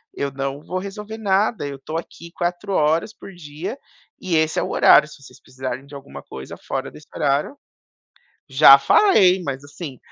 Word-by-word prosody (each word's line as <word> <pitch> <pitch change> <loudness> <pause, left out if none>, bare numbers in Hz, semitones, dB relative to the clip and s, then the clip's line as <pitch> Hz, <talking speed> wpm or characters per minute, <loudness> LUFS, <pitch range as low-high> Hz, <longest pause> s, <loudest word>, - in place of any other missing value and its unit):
eu 140 -1 -3
não 135 +1 -4
vou 185 - -3
resolver 210 +3 -8
nada, 205 -4 0
eu 140 - -6
estou 155 +4 -6
aqui 170 0 -12
4 180 +3 -3
horas 160 +6 +1
por 195 - -12
dia 165 - -7 0.4
e 180 -3 -1
esse 160 0 +1
é - - -1
o - - -4
horário - - +6
se 150 - -15
vocês 135 - -16
precisarem 130 0 -7
de 140 - -17
alguma 140 0 -11
coisa 65 0 -10
fora 135 0 -5
desse 150 - -15
horário" 145 - 0 1.0
já 135 0 +8
falei 190 - +4
mas, 140 -3 -5
assim 145 -2 -9
155 Hz, 180 wpm, -21 LUFS, 140-185 Hz, 1.0 s, já